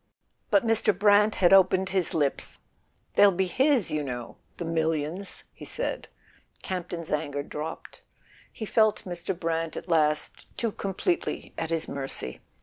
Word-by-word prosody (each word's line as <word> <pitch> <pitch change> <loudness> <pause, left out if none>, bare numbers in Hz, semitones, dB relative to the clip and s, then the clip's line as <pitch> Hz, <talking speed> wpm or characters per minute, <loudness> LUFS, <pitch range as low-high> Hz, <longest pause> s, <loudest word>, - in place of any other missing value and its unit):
But 200 +1 +3
Mr. 225 -4 +3
Brant 205 +1 +5
had 180 0 +4
opened 190 0 +5
his 190 -3 +2
lips. 145 -4 -1 0.6
"They'll 205 -1 +7
be 190 +1 0
his, 260 - +2
you 155 - 0
know: 120 -3 -6 0.2
the 175 - -4
millions," 165 +3 -2
he - - -13
said. - - -3 0.6
Campton's 175 -3 -4
anger 145 -1 -1
dropped: 150 +3 -7 0.5
he 220 - -6
felt 215 0 +2
Mr. 175 0 -4
Brant 165 -1 -2
at - - -7
last 150 -3 +1
too 230 -2 0
completely 205 - -2
at 165 - -3
his 165 -1 -1
mercy. 135 - -3
175 Hz, 145 wpm, -27 LUFS, 160-200 Hz, 0.6 s, They'll